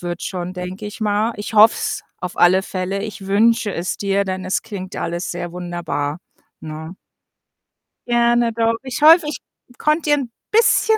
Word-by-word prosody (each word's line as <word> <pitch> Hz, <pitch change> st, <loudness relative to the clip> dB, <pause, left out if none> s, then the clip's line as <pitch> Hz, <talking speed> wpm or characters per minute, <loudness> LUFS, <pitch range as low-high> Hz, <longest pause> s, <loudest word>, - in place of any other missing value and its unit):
wird 175 Hz, 0 st, -5 dB
schon, 180 Hz, -1 st, -4 dB
denke 185 Hz, +3 st, -6 dB
ich 210 Hz, -, -9 dB
mal. 215 Hz, +2 st, +1 dB
Ich 205 Hz, +2 st, -6 dB
hoffe 215 Hz, +1 st, +7 dB
es -, -, -3 dB, 0.2 s
auf 180 Hz, 0 st, -5 dB
alle 185 Hz, +2 st, +5 dB
Fälle. 195 Hz, +1 st, -3 dB
Ich 210 Hz, -2 st, -7 dB
wünsche 220 Hz, +2 st, +3 dB
es 175 Hz, +2 st, -2 dB
dir, 200 Hz, 0 st, 0 dB
denn 185 Hz, -1 st, -4 dB
es 185 Hz, 0 st, -1 dB
klingt 195 Hz, -4 st, -7 dB
alles 170 Hz, +2 st, -3 dB
sehr 175 Hz, 0 st, -5 dB
wunderbar, 170 Hz, -4 st, -4 dB, 0.4 s
ne? 160 Hz, +2 st, -7 dB, 1.1 s
Gerne, 240 Hz, 0 st, +3 dB
doch. 230 Hz, 0 st, +1 dB
Ich 260 Hz, +1 st, -5 dB
hoffe, 320 Hz, +1 st, +7 dB
ich 300 Hz, -, -3 dB, 0.4 s
konnte 305 Hz, +1 st, +1 dB
dir 295 Hz, -, +5 dB
'n 260 Hz, -5 st, -4 dB, 0.2 s
bisschen 445 Hz, 0 st, +4 dB
200 Hz, 170 wpm, -20 LUFS, 180-230 Hz, 1.1 s, hoffe